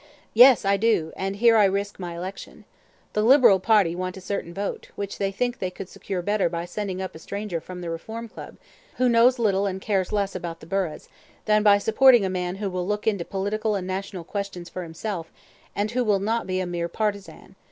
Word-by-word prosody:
"Yes, 245 -1 +7
I 200 0 +3
do; 200 -7 +1
and 195 +1 -3
here 230 +2 +5
I 210 - +6
risk 200 +1 -1
my 175 -2 -5
election. 185 +3 -8 0.5
The 210 - +1
Liberal 235 -4 +6
party 200 -4 +3
want 185 +1 -4
a - - -7
certain 185 -2 -4
vote, 200 +3 -5
which 200 -1 -5
they 195 -1 0
think 245 +4 -2
they 185 - -2
could 185 +1 -9
secure 185 -3 -5
better 205 -2 +1
by 170 0 -4
sending 190 0 -4
up 185 - -6
a 160 - -11
stranger 200 -1 -4
from 180 +1 -9
the 170 - -5
Reform 220 +8 -6
Club, - - -11 0.4
who 255 - +2
knows 240 +2 +5
little 200 -4 +1
and 190 -1 -3
cares 190 -2 -1
less 200 -2 0
about 170 -2 -6
the - - -12
burghs, 180 -2 -3 0.4
than 215 0 +3
by 205 -1 +6
supporting 230 +2 +5
a 190 - -1
man 180 0 -2
who 200 -1 -3
will 180 0 -3
look 210 0 -2
into 200 -5 +1
political 210 +4 -2
and 190 -2 -3
national 190 -1 -4
questions 190 -2 -5
for 185 - -6
himself, 170 0 -5 0.4
and 210 +1 -1
who 250 +1 0
will 210 -3 +2
not 225 +3 -1
be 185 0 -1
a 185 - -1
mere 175 -1 -3
partisan. 200 -2 -4
195 Hz, 215 wpm, -24 LUFS, 180-215 Hz, 0.5 s, Yes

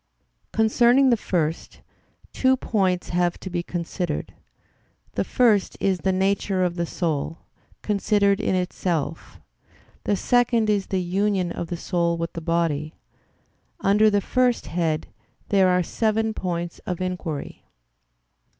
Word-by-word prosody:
Concerning 240 +4 +4
the - - +5
first, 165 -7 -2 0.5
two 260 0 +3
points 190 -7 0
have 175 0 0
to 190 - -7
be 175 -1 -1
considered; 175 -1 -4 0.8
the - - 0
first 225 -6 +2
is 190 -2 +1
the 190 - +1
nature 190 0 +1
of 180 -1 0
the 170 -1 -2
soul 160 -2 -2 0.5
considered 200 -1 +2
in - - +1
itself; 180 -3 -2 0.7
the 205 - +2
second 235 0 +2
is 200 -2 0
the 190 -2 -1
union 190 0 0
of 170 - -4
the 175 - -4
soul 170 -1 0
with 165 0 -4
the 165 - -5
body. 160 -2 -1 0.9
Under 210 +2 +4
the 205 -1 +2
first 250 +3 +1
head 160 -2 -1 0.4
there 195 -2 +4
are 180 0 +3
seven 220 +3 0
points 175 -3 -4
of 180 -2 -5
inquiry. 180 -5 -4
185 Hz, 130 wpm, -24 LUFS, 170-210 Hz, 0.9 s, the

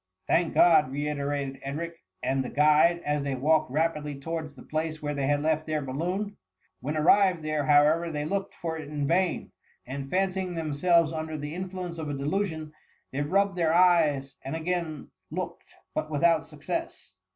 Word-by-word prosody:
"Thank 170 -1 +2
God!" 160 -6 +6
reiterated 140 -1 -2
Edric 155 +5 -4 0.3
and 135 0 +1
the 125 - -5
guide, 155 +4 +4
as 150 0 0
they 140 -1 -2
walked 155 +3 +2
rapidly 150 -1 -1
towards 160 0 -5
the - - -12
place 155 0 -3
where 150 -1 -3
they 140 -2 -1
had 145 0 +1
left 155 0 +1
their, 155 -1 -1
balloon. 180 +10 -3 0.4
When 150 +5 -3
arrived 180 +1 +4
there, 155 -2 -1
however, 155 +3 +4
they 150 -2 -3
looked 195 +4 -2
for 160 -1 -4
it 150 -2 -8
in 145 -1 -2
vain; 175 +2 +1 0.3
and 135 +1 -6
fancying 185 0 0
themselves 165 +1 +2
under 160 0 -4
the 150 +1 -5
influence 180 -1 -5
of 155 -2 -4
a 145 - -2
delusion, 160 0 -2 0.4
they 140 - -2
rubbed 195 +6 +2
their 165 -1 +2
eyes, 155 -7 +3
and 135 +3 -5
again 165 -2 -3 0.2
looked, - - -6 0.2
but 155 - -2
without 160 +1 +2
success. 335 - -5
155 Hz, 170 wpm, -27 LUFS, 145-170 Hz, 0.4 s, God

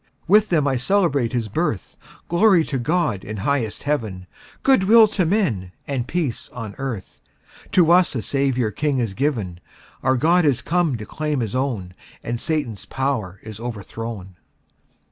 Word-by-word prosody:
With 210 +4 +5
them 155 -5 +2
I 135 -2 +1
celebrate 140 - +1
His 120 -3 -1
birth 110 - -2 0.3
Glory 175 -1 +4
to 140 -4 -3
God, 150 - 0
in 105 +1 -6
highest 115 0 -1
Heaven, 110 -11 -2 0.4
Good 265 -8 +4
will 225 +2 +7
to 185 -5 0
men, 120 - 0
and 130 -4 -2
peace 155 -9 -2
on 115 -4 -7
earth, 120 -8 -5 0.5
To 170 -2 +5
us 180 -4 +4
a 115 - -2
Saviour 130 -5 0
king 145 +3 -1
is 115 -6 -1
given; 110 - -2 0.4
Our 130 0 +2
God 170 +6 +3
is 140 -6 +2
come 170 -6 +1
to 105 - -7
claim 150 +3 -2
His 110 -4 -2
own, 120 -9 -2 0.3
And 120 0 -3
Satan's 145 - -2
power 125 -9 -2
is 110 -1 -9
overthrown! 110 -4 -6
130 Hz, 160 wpm, -22 LUFS, 110-160 Hz, 0.5 s, will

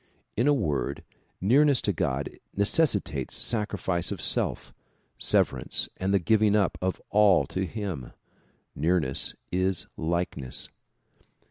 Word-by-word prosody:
In 120 +5 +1
a - - +6
word, 75 - -2 0.4
nearness 135 +6 +4
to - - 0
God 65 +2 -1 0.3
necessitates 100 - +1
sacri 105 -3 0
fice 90 -1 -1
of 100 - -4
self, - - +1 0.5
severance - - +1
and 95 +1 -1
the 100 - +4
giving 105 +3 +3
up 100 -4 +2
of 95 0 -1
all 100 -3 +5
to 95 0 -3
him. 95 - -5 0.6
Nearness 80 -3 0 0.2
is 95 0 0
likeness. 80 -6 -2
95 Hz, 120 wpm, -27 LUFS, 85-105 Hz, 0.6 s, a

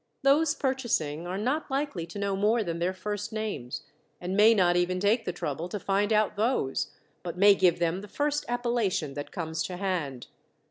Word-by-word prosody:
Those 295 +3 +4
purchasing 215 - -1
are 185 +2 -3
not 260 +11 -1
likely 270 - -2
to 175 - -9
know 200 -1 -1
more 215 +4 +2
than 170 -3 -3
their 175 +2 +1
first 205 +3 -4
names, 215 - -4 0.4
and 180 +2 -3
may 215 +3 +7
not 175 -3 +3
even 175 +1 +1
take 210 +5 +2
the - - -1
trouble 160 +1 -4
to 210 - -4
find 200 +2 0
out 215 -1 +2
those, 215 - 0 0.3
but 175 0 -6
may 200 +2 +7
give 185 -3 +3
them 175 +2 0
the 205 - -9
first 295 +6 -1
appellation 235 - 0
that 145 +1 -6
comes 160 -3 -3
to 180 - -5
hand. 170 -10 -2
195 Hz, 190 wpm, -28 LUFS, 175-225 Hz, 0.4 s, may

